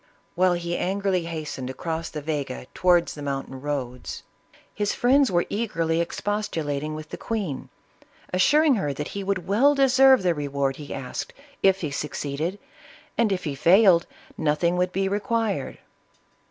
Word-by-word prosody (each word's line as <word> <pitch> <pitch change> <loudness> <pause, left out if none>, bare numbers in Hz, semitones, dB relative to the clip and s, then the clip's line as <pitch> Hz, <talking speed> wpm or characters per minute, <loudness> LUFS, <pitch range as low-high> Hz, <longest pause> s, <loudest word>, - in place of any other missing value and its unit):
While 185 0 +3
he 175 0 -2
angrily 190 -1 0
hastened 155 -6 -5
across 165 +4 -4
the 150 -2 -6
Vega 140 - -3
towards 175 -1 +3
the 150 - -9
mountain 135 -2 -4
roads, 130 -4 -4 0.5
his 205 0 -1
friends 270 +2 +4
were 175 -1 +2
eagerly 170 -7 0
expostu 205 -1 -3
lating 145 +1 -2
with 155 0 -8
the - - -7
queen, 195 - -3 0.6
assuring 290 +11 +4
her 145 -1 -1
that 150 +2 -5
he 200 - -5
would 190 -2 -2
well 260 +9 +4
deserve 265 -3 +5
the 180 -2 +3
reward 140 -2 -2
he 145 -1 -9
asked, 135 -2 -5 0.3
if 190 0 +4
he 155 -4 -2
succeeded, 150 +5 -3 0.6
and, 230 -3 +2
if 190 - -1
he 150 - -2
failed, 170 +4 +5 0.3
nothing 160 +3 +1
would 180 0 +1
be 195 +1 0
required. 215 +1 -1
170 Hz, 155 wpm, -25 LUFS, 150-200 Hz, 0.6 s, deserve